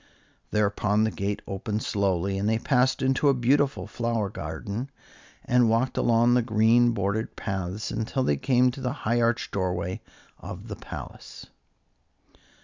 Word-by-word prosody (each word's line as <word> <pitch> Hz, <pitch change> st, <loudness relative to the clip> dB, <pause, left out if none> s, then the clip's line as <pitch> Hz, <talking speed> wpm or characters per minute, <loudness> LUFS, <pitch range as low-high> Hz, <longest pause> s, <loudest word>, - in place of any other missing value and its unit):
Thereupon 105 Hz, 0 st, +1 dB
the 110 Hz, -, +1 dB
gate 100 Hz, +3 st, -3 dB
opened 105 Hz, +2 st, -3 dB
slowly, 95 Hz, -1 st, 0 dB
and 105 Hz, +2 st, 0 dB
they 110 Hz, -, +2 dB
passed 130 Hz, +2 st, +1 dB
into 135 Hz, +2 st, +3 dB
a 135 Hz, -, +4 dB
beautiful 135 Hz, +3 st, +1 dB
flower 115 Hz, -4 st, -2 dB
garden, 100 Hz, -, -5 dB, 0.6 s
and 125 Hz, -2 st, +4 dB
walked 115 Hz, +3 st, +1 dB
along 120 Hz, +1 st, +3 dB
the 125 Hz, -, +4 dB
green 115 Hz, +1 st, +4 dB
bordered 105 Hz, +1 st, -2 dB
paths 95 Hz, +1 st, -4 dB
until 110 Hz, +5 st, -1 dB
they 75 Hz, -, +1 dB
came 125 Hz, -, +3 dB
to 135 Hz, -, -9 dB
the 125 Hz, 0 st, -1 dB
high 120 Hz, +2 st, +2 dB
arched 115 Hz, 0 st, 0 dB
doorway 90 Hz, -2 st, -2 dB, 0.4 s
of -, -, -8 dB
the -, -, -4 dB
palace. -, -, -9 dB
110 Hz, 145 wpm, -26 LUFS, 100-125 Hz, 0.6 s, a